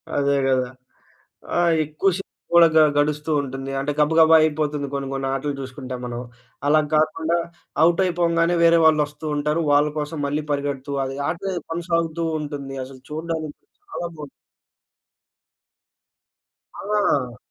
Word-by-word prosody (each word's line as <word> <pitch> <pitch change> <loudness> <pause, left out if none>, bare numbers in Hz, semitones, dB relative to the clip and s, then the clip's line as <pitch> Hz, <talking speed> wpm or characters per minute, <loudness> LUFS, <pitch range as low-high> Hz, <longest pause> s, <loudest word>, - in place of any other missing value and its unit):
అదే 140 0 +2
గదా! 130 -1 +1 0.9
ఆ! - - +3 0.3
ఎక్కువ 155 +6 0
షేపు 195 - -10 0.2
గూడ 170 -1 +8
గ 160 - +7 0.2
గడుస్తూ 150 +1 0
ఉంటుంది. 135 0 -6
అంటే, 140 +2 -1
గబగబ 160 +2 +5
అయిపోతుంది, 150 -2 0
కొన్ని 140 -1 -3
కొన్ని 135 0 -2
ఆటలు 140 +1 -2
చూసుకుంటే 130 -1 -7
మనం. 120 0 -5 0.5
అలా 155 +1 +5
గాకుండా 160 +2 +1 0.5
ఔటయిపోంగానే, 170 -1 +2
వేరే 170 0 +6
వాళ్ళు 155 -1 +5
వస్తూ 150 +2 -12
ఉంటారు, 150 +3 0
వాళ్ళ 145 +1 +4
కోసం 150 +1 -4
మళ్ళీ 145 +2 -2
పరిగెడుతూ, 140 -1 -2
అది 135 +1 -5
ఆట 170 - -3 0.3
కొనసాగుతూ 165 -1 -1 0.2
ఉంటుంది. 140 -2 -6
అసలు 130 -1 -13
చూడడానికి 155 -1 -4 0.3
చాలా 175 - -4
బావుం 150 -2 -9 2.5
ఆ! 145 - 0
150 Hz, 125 wpm, -22 LUFS, 140-165 Hz, 2.5 s, గూడ